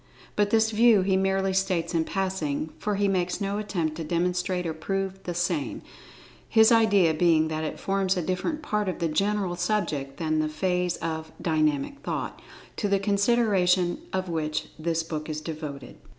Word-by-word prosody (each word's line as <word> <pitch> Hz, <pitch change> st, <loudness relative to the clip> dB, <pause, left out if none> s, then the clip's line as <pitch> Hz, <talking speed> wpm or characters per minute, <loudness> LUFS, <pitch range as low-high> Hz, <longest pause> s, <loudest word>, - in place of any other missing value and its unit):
But 205 Hz, -1 st, +2 dB
this 220 Hz, 0 st, +3 dB
view 220 Hz, -2 st, +5 dB
he 190 Hz, 0 st, +2 dB
merely 195 Hz, 0 st, +1 dB
states 190 Hz, -3 st, 0 dB
in 165 Hz, -1 st, +1 dB
passing, 165 Hz, -6 st, -2 dB
for 210 Hz, -1 st, -1 dB
he 200 Hz, 0 st, +1 dB
makes 180 Hz, -2 st, 0 dB
no 200 Hz, 0 st, -1 dB
attempt 170 Hz, -7 st, -2 dB
to 165 Hz, -, -3 dB
demonstrate 180 Hz, +2 st, -1 dB
or 165 Hz, -, -1 dB
prove 195 Hz, +4 st, -3 dB
the 175 Hz, -, -3 dB
same, 170 Hz, -6 st, -1 dB, 0.7 s
his 220 Hz, +1 st, +6 dB
idea 205 Hz, -7 st, +5 dB
being 160 Hz, -1 st, +3 dB
that 155 Hz, 0 st, -2 dB
it 155 Hz, -, -4 dB
forms 195 Hz, -1 st, 0 dB
a 180 Hz, -, -1 dB
different 185 Hz, -, -2 dB
part 210 Hz, -6 st, 0 dB
of 185 Hz, -, -3 dB
the 170 Hz, -, 0 dB
general 195 Hz, +2 st, 0 dB
subject 170 Hz, -8 st, -1 dB
than 155 Hz, -1 st, 0 dB
the 155 Hz, 0 st, 0 dB
phase 180 Hz, +2 st, 0 dB
of 160 Hz, -1 st, -4 dB
"Dynamic 155 Hz, -, 0 dB
Thought," -, -, -4 dB, 0.4 s
to 210 Hz, -, 0 dB
the 200 Hz, 0 st, +3 dB
consideration 200 Hz, -3 st, +2 dB
of 190 Hz, 0 st, -2 dB
which 155 Hz, -3 st, -2 dB
this 165 Hz, 0 st, 0 dB
book 155 Hz, -1 st, -5 dB
is 155 Hz, 0 st, -3 dB
devoted. 150 Hz, -4 st, -7 dB
180 Hz, 175 wpm, -26 LUFS, 160-200 Hz, 0.7 s, his